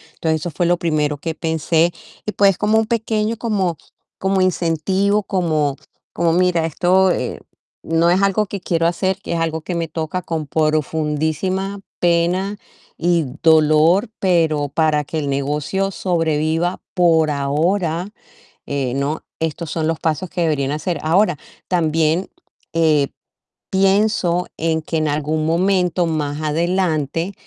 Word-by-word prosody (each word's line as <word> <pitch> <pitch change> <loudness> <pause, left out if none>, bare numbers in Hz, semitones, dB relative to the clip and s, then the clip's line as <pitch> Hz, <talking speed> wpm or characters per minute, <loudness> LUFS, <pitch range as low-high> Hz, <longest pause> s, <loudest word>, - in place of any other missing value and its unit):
Entonces, 160 -1 -1
eso 175 - -4
fue 175 +3 -1
lo 175 - +4
primero 150 -3 0
que 160 +2 -4
pensé. 160 +1 +1 0.3
Y 210 - -3
pues, 195 -2 +4
como 215 +1 +2
un 220 - -1
pequeño, 225 -1 -1
como 195 -9 -1 0.4
como 190 0 +1
incentivo, 185 +4 +1
como: 155 -7 0 0.6
"Mira, 180 -2 +2
esto, 185 +4 +3
eh, 125 - -2 0.4
no 165 +1 +2
es 185 +2 +3
algo 195 +1 +2
que 200 - -5
quiero 165 -1 0
hacer, 185 +2 0
que - - -5
es 165 - -1
algo 160 -1 -1
que 175 +2 -4
me 165 -1 -1
toca 160 +3 -3
con 160 -3 -3
profundísima 155 +5 -1 0.2
pena 175 +4 +1 0.4
y 170 -2 +2 0.2
dolor, 160 +5 +4
pero 160 -6 +2
para 150 0 +1
que 160 +1 -3
el 145 -2 -2
negocio 150 +8 -1
sobreviva 165 -1 0 0.2
por 165 -3 +4
ahora, 165 +6 0 0.6
eh, 135 -3 -2
¿no? 140 +3 -2 0.2
Estos 160 0 -3
son 160 -2 -1
los 165 -1 -1
pasos 165 +3 -1
que 180 -1 -3
deberían 145 -4 0
hacer". 155 +1 -2
Ahora, 175 +1 +3 0.3
también, 165 0 +1 0.4
eh, 155 -4 +3 0.6
pienso 190 -2 +2
en 160 0 0
que 160 - -2
en 155 -1 0
algún 155 +1 -1
momento, 180 +1 +2
más 150 -1 -2
adelante, 165 +1 0
165 Hz, 140 wpm, -19 LUFS, 155-185 Hz, 0.6 s, lo